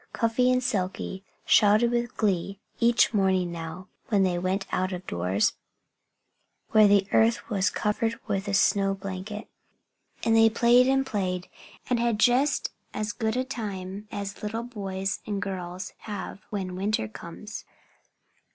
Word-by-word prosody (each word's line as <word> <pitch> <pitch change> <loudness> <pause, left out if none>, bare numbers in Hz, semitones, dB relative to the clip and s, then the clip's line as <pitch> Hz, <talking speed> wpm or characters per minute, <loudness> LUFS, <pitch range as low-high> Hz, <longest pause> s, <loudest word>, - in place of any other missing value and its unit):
Cuffy 235 +2 +2
and 255 0 +2
Silkie 190 -3 -2 0.2
shouted 215 +3 +5
with 240 -1 -1
glee 195 -1 0 0.2
each 235 0 +4
morning 190 -3 +2
now, 165 +2 -7 0.2
when 205 -4 +3
they 180 -2 +1
went 185 +2 -1
out 185 +1 0
of 180 0 -5
doors, 90 +4 +1 1.2
where 215 -1 +7
the 200 -1 +4
earth 225 +1 +2
was 195 -2 +2
covered 225 +2 -1
with 200 -2 -2
a 200 - +1
snow 195 0 +3
blanket. 195 +2 -6 0.8
And 225 - +3
they 225 0 +7
played 240 +3 +5
and 270 0 +2
played 185 -5 -2 0.4
and 245 -2 +1
had 235 -2 +1
just 260 +5 +3 0.2
as 215 0 -2
good 220 0 -1
a 255 - +1
time 205 -5 -6
as 200 0 -5
little 225 +2 -3
boys 195 -4 -3
and 205 -2 -2
girls 185 -1 -5
have 205 -1 -6
when 190 -3 -4
winter 195 - 0
comes. 170 - -9
205 Hz, 145 wpm, -27 LUFS, 190-225 Hz, 1.2 s, where